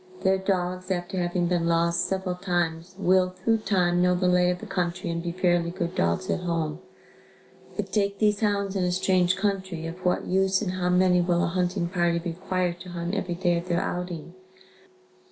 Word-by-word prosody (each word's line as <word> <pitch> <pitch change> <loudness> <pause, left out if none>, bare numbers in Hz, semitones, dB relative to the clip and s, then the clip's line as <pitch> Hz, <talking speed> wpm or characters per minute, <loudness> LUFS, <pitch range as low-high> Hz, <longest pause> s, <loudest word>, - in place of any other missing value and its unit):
Their 190 0 +3
dogs 185 -1 -1
after 185 0 -2
having 175 0 0
been 170 -1 +1
lost 170 0 +2
several 190 -1 -2
times 175 -1 -2
will, 185 -1 +3
through 190 +5 0
time, 180 -4 +2
know 180 0 +3
the 180 0 +1
lay 180 0 +4
of 180 - 0
the 220 - -9
country 180 -3 -2
and 170 0 -2
be 170 0 -3
fairly 175 -1 +1
good 170 0 -3
dogs 85 - 0
at - - 0
home, 165 -3 -2 1.0
but 200 -2 -4
take 200 -1 +1
these 210 -2 +2
hounds 200 -2 0
in 190 - +1
a 180 - +1
strange 180 0 +2
country, 190 -4 -2
of 170 +3 -7
what 180 - +1
use 190 0 +2
and 200 -4 -2
how 180 -1 -1
many 180 0 +4
will 175 0 +1
a - - +1
hunting 180 0 0
party 175 -1 +1
require 175 +1 -2
to 175 +1 -11
hunt 175 +1 -4
every 185 -3 -2
day 175 -1 +1
of 170 - -9
their 175 -1 +1
outing? 175 -2 -4
180 Hz, 195 wpm, -26 LUFS, 175-190 Hz, 1.0 s, lay